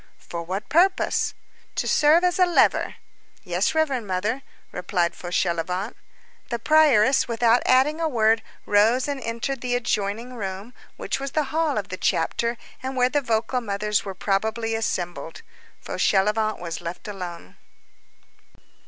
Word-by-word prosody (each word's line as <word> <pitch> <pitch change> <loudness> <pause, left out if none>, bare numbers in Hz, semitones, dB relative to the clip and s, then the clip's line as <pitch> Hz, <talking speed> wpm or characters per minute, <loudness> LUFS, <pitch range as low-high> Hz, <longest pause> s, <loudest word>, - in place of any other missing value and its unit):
"For 170 - -3
what 185 +5 -4
purpose?" 370 +5 +2 0.4
"To - - -1
serve 310 +4 +4
as 360 0 +1
a 365 - +7
lever." 345 - +3 0.5
"Yes, - - 0
reverend 275 -8 0
Mother," 205 +8 -1 0.3
replied 180 -1 -1
Fauchelevent. 180 +3 -2 0.5
The 235 - -1
prioress, 275 -2 +4
without 235 0 +3
adding 280 +5 +3
a 325 - +1
word, 225 -3 +3 0.2
rose 225 +6 +3
and 280 -2 -3
entered 235 +3 -3
the 245 -1 -1
adjoining 230 0 -2
room, 200 +1 -6 0.2
which - - -3
was 275 0 -5
the 305 - +2
hall 315 -4 +1
of 205 - -3
the 185 - -5
chapter, 235 +10 0 0.2
and 260 +1 -4
where 250 0 +3
the 290 +2 +1
vocal 235 +1 0
mothers 210 -1 -1
were 195 -2 -6
probably 220 +4 -1
assembled. 175 -8 -3 0.4
Fauchelevent 210 +2 +1
was 170 -2 -6
left 170 +4 -7
alone. 175 - -7
225 Hz, 140 wpm, -24 LUFS, 195-260 Hz, 0.5 s, a